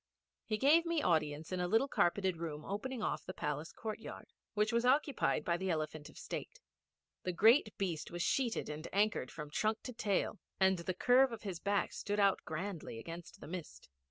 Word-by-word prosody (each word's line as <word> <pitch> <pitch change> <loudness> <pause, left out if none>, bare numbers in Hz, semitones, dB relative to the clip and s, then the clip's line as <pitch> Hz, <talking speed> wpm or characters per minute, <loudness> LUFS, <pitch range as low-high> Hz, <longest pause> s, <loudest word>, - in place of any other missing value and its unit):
He 215 - -1
gave 300 +7 +5
me 335 -3 0
audience 155 -1 +1
in 185 - -1
a 180 - 0
little 225 +8 +3
carpeted 185 -6 +1
room 155 -2 -5
opening 225 +4 -3
off - - -1
the 185 - -7
palace 150 +2 -3
courtyard 220 -1 -7 0.2
which 210 +1 +2
was 235 0 +3
occupied 270 +1 +2
by 170 -1 +2
the 190 +1 -2
Elephant 155 -2 -2
of - - -16
State. - - -6 0.6
The 180 - -1
great 220 - +5
beast 170 -6 -2
was 175 0 -2
sheeted 250 -4 +1
and 150 +2 -5
anchored 205 -9 +1
from 150 -2 -8
trunk 215 +5 0
to 250 - -6
tail, 210 -1 0 0.2
and 190 -1 +4
the 175 +2 -3
curve 250 +5 +5
of 230 -1 -7
his 190 -5 -4
back 200 +1 0
stood 205 0 -2
out 200 -2 +4
grandly 170 - -4
against 170 +7 -8
the - - -8
mist. 170 - -7
190 Hz, 190 wpm, -35 LUFS, 165-225 Hz, 0.6 s, gave